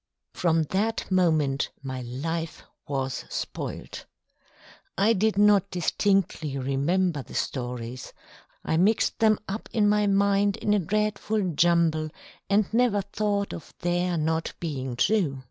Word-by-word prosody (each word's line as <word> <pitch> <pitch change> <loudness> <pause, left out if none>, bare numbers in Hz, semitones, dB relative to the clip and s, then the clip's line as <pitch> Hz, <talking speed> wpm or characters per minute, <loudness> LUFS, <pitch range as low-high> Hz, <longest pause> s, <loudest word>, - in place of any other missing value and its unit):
From 165 -2 +2
that 215 +2 -1
moment 155 -7 +2
my 130 -1 -4
life 160 +7 -4 0.2
was 135 -2 -2
spoilt. - - -5 0.9
I 205 +4 +4
did 215 0 +1
not 205 -2 +5
distinctly 180 -5 0
remember 145 +5 0
the - - -12
stories: 125 -1 -4 0.5
I 160 - +1
mixed 205 +6 +2
them 215 -2 +4
up 205 +3 -5
in 215 -3 +2
my 210 0 +3
mind 200 0 +2
in 210 - 0
a 210 - +3
dreadful 210 +1 -1
jumble, 165 -1 +2 0.4
and 205 +1 +4
never 230 -4 +2
thought 200 0 -1
of - - -10
their 175 0 0
not 160 +1 -1
being 135 -7 -4
true. 155 - +1
180 Hz, 130 wpm, -26 LUFS, 150-205 Hz, 0.9 s, not